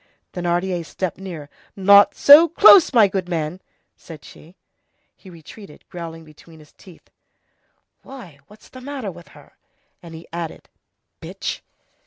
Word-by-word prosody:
Thénardier 175 0 -3
stepped 180 +2 -7
nearer. 170 -6 -10 0.3
"Not 200 +1 +4
so 300 +4 +6
close, 370 +1 +5
my 230 -6 +4
good 185 -2 -5
man!" 165 +1 -5 0.3
said 155 -3 -15
she. 165 +4 -17 0.6
He 190 - -18
retreated, 170 +1 -16
growling 165 -2 -10
between 160 +1 -19
his 150 -1 -20
teeth:— 180 -4 -20 0.9
"Why, 200 - -14
what's 210 +1 -20
the 255 - -14
matter 260 -6 -7
with 170 0 -16
her?" 145 - -21 0.4
And 165 -2 -13
he 160 - -14
added:— 170 -2 -8 0.5
"Bitch!" - - -7
180 Hz, 135 wpm, -19 LUFS, 165-200 Hz, 0.9 s, so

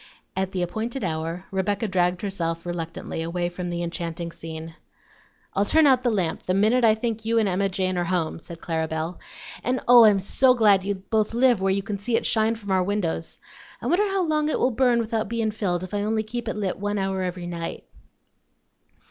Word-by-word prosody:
At 190 0 -1
the 185 -2 -1
appointed 220 +8 -3
hour 165 +1 -3
Rebecca 200 +3 -1
dragged 180 -1 +1
herself 170 -4 -2
reluctantly 165 -1 -4
away 175 +1 -2
from 175 0 -5
the 175 0 -2
enchanting 170 0 -4
scene. 160 0 -8 0.8
"I'll 200 - +2
turn 315 +10 +4
the 255 -3 +4
lamp 185 -7 0
out - - -29
the 185 - +2
minute 220 +5 +3
I 220 -1 +6
think 220 -1 -3
you 230 +1 +1
and 220 -2 +3
Emma 195 +1 +1
Jane 185 -1 -1
are 175 - 0
home," 170 -2 -1
said 165 0 -11
Clara 160 -1 -1
Belle. 160 +2 -4 0.4
"And, 255 +1 0
oh! 240 -1 +9
I'm 205 -2 +5
so 255 +6 +3
glad 205 -5 +4
you 200 +1 -1
both 215 +3 -1
live 245 -4 +4
where 195 - +2
you 195 0 0
can 205 -1 -4
see 225 +3 -1
it - - -2
shine 220 0 +2
from 205 -3 -7
our 190 -1 +3
windows. 180 -4 -2 0.4
I - - -9
wonder 390 +5 +3
how 390 -1 0
long 305 -1 +1
it - - +1
will 255 - +2
burn 245 0 +3
without 220 -2 -2
bein' 225 -2 0
filled 185 -5 -2
if 185 - -8
I 205 - 0
only 220 +1 0
keep 235 +2 -5
it - - -2
lit 200 -4 -2
one 205 +1 -1
hour 195 -1 -1
every 180 -1 -3
night?" 170 -1 -5
195 Hz, 215 wpm, -24 LUFS, 175-225 Hz, 0.8 s, oh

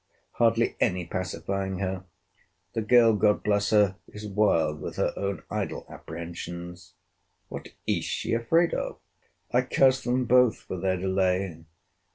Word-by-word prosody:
Hardly 115 0 +2
any 90 -5 +1
pacifying 95 +2 -3
her! 95 -1 -3 0.7
The 115 - -1
girl, 115 +1 +5
God 105 0 +2
bless 100 -1 +1
her! 105 -3 +3
is 105 0 -9
wild 95 -7 +2
with - - -5
her - - 0
own 100 -4 -3
idle - - -3
apprehensions! 85 +1 -8 0.5
What - - -7 0.2
is - - 0
she - - -2
afraid 165 +10 +2
of? - - -3 0.5
I 125 - +4
curse 130 +1 +3
them 125 +1 +1
both 125 -1 +5
for 95 - -7
their 95 0 0
delay. 95 -2 0
100 Hz, 140 wpm, -27 LUFS, 90-115 Hz, 0.7 s, girl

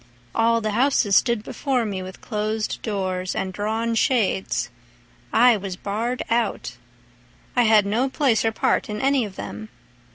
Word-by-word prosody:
All 230 0 +2
the 215 0 -1
houses 230 -3 +2
stood 235 -2 +3
before 255 -2 -1
me 195 -3 -3
with 185 +1 -9
closed 215 0 -2
doors 185 -4 -2
And 190 -1 -2
drawn 220 +3 -1
shades—I 120 - 0
was 195 -2 -5
barred 225 +6 -3
out; 230 - -1 0.8
I 245 -1 +4
had 215 -2 +5
no 235 +7 +1
place 260 -6 +2
or 225 - +2
part 220 - 0
in 210 0 -4
any 270 -3 +2
of 195 -2 -9
them. 215 +2 -7
215 Hz, 150 wpm, -23 LUFS, 195-235 Hz, 0.8 s, had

